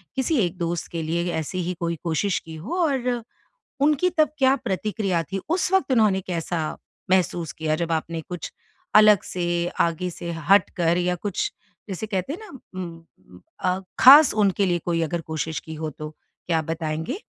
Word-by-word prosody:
किसी 265 +3 +1
एक 175 +1 -5
दोस्त 170 -1 -2
के 165 -1 -3
लिए 170 +2 -1
ऐसी 160 +4 -3
ही 180 +2 -2
कोई 170 -1 -1
कोशिश 175 +4 0
की 160 0 -9
हो 225 - -5
और 250 -4 0 0.6
उनकी 300 +4 +3
तब 310 - +4
क्या 265 0 +5
प्रतिक्रिया 195 -4 -1
थी? 195 +6 -4
उस 355 +2 +1
वक़्त 315 -9 +2
उन्होंने 210 -5 +3
कैसा 165 -3 -3 0.3
महसूस 175 -3 +1
किया 155 -1 -1
जब 170 -1 -2
आपने 160 +1 -2
कुछ 175 -2 -6 0.4
अलग 210 -2 +7
से, 175 -1 -1
आगे 170 +2 +1
से 170 0 -6 0.2
हटकर 175 -4 +4
या 180 0 +1
कुछ 195 +2 -2 0.4
जिसे 195 +3 -4
कहते 195 +5 -2
हैं 355 - -7
ना 430 - -11 0.3
उम, 165 - -11 0.2
अ, 185 +1 0 0.2
ख़ास 285 +3 +9
उनके 200 -2 +2
लिए 175 -1 +1
कोई 165 -1 +1
अगर 165 +2 -1
कोशिश 160 0 -2
की 160 - -9
हो 155 0 -4
तो, 150 +2 -8 0.4
क्या 165 -2 +2
आप 155 - -2
बताएँगे? 160 - -3
175 Hz, 175 wpm, -24 LUFS, 165-210 Hz, 0.6 s, ख़ास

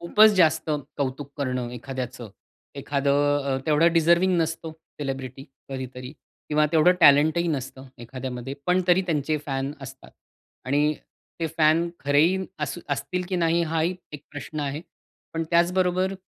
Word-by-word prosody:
खूपच 215 +5 +6
जास्त 160 -1 +3 0.3
कौतुक 140 +1 -3
करणं 125 -3 -2
एखाद्याचं. 125 -3 -6 0.4
एखादं 140 0 -1 0.3
अ, 135 -1 0
तेवढं 160 +2 +4
डिझर्व्हिंग 170 +2 +3
नसतो, 160 0 -3 0.3
सेलिब्रिटी 135 -1 -5 0.2
कधीतरी 130 0 -7 0.4
किंवा 150 0 +3
तेवढं 165 +3 +5
टॅलेंट 150 +2 +6
ही 170 - 0
नसतं 135 -2 -4 0.2
एखाद्यामध्ये, 130 +1 -6
पण 180 +1 +3
तरी 180 +1 +4
त्यांचे 155 -1 0
फॅन 135 0 -2
असतात. 135 0 -11 0.5
आणि 145 +3 +1 0.5
ते 165 - 0
फॅन 160 +2 +4 0.2
खरेही 150 +6 +4 0.2
अस - - -3
असतील, 180 -1 -2
की 185 - -1
नाही, 170 0 +2
हाही 165 +2 0 0.2
एक 150 -1 -8
प्रश्न 150 +1 -6
आहे. 145 +1 -3 0.5
पण 165 - -1
त्याचबरोबर 180 +2 +2
150 Hz, 135 wpm, -25 LUFS, 135-170 Hz, 0.5 s, खूपच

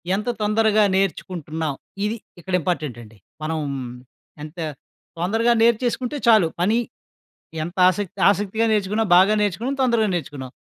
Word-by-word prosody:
ఎంత 210 +5 -3
తొందరగా 215 0 +3
నేర్చుకుంటున్నాం? 160 -5 -2 0.3
ఇది 215 - -1 0.2
ఇక్కడ 185 +2 -7
ఇంపార్టెంట్ 150 -8 -2
అండి. 110 -1 -15 0.3
మనం 160 0 -2 0.8
ఎంత 155 +3 -10 0.6
తొందరగా 225 +7 +2
నేర్చేసుకుంటే 240 +4 +1
చాలు. 215 -7 +6
పని 215 +6 +2 0.9
ఎంత 175 +4 -8
ఆసక్తి 185 0 -4
ఆసక్తిగా 205 +3 0
నేర్చుకున్నాం, 210 +1 0
బాగా 195 +3 +5
నేర్చుకున్నాం, 210 +7 -1
తొందరగా 230 -5 +2
నేర్చుకున్నాం. 140 -6 -5
200 Hz, 120 wpm, -22 LUFS, 170-220 Hz, 0.9 s, చాలు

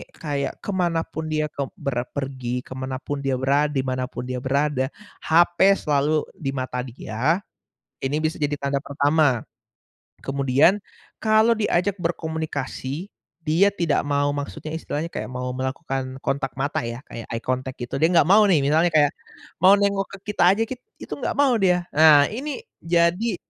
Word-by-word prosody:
kayak 140 -3 -3
kemanapun 165 -4 -1
dia 155 0 0
kek 140 -1 -3
berpergi 125 -1 -3
kemanapun 130 +2 -5
dia 135 -1 +1
berada 140 +3 +2
dimanapun 130 -1 -2
dia 125 0 -2
berada 135 0 0 0.3
hape 175 +3 +4
selalu 150 -1 +1
di 145 -8 -3
mata 130 -1 -3
dia, 130 - -2 0.6
ini 135 +2 0
bisa 155 +1 -1
jadi 145 -1 -1
tanda 140 0 0
pertama, 145 -3 +2 0.8
kemudian 140 +7 +3 0.4
kalau 220 +1 +4
diajak 200 -2 +1
berkomunikasi 160 -1 -3 0.4
dia 170 +6 +4
tidak 170 -6 +1
mau 145 0 +1
maksudnya 155 +2 -5
istilahnya 160 0 -4
kayak - - -4
mau 125 0 -3
melakukan 130 0 -3
kontak 135 -1 -1
mata 140 +2 0
ya 115 +1 -5
kayak 115 - -8
eye 115 0 -4
contact 130 0 -2
gitu 120 - -4
dia 160 - +5
nggak 170 - +6
mau 205 +4 +7
nih 175 -5 +5
misalnya 160 +4 +3
kayak, 145 -2 +5 0.5
mau 190 +2 +9
nengok 200 -1 +1
ke - - -10
kita 210 - +1
aja 225 - +1
kit 255 - -5 0.2
itu - - -10
nggak - - -2
mau 280 -3 +4
dia, 180 -2 +3
ah, 155 -2 +8
ini 290 - -5 0.2
jadi 175 +6 +1
145 Hz, 150 wpm, -23 LUFS, 130-170 Hz, 0.8 s, mau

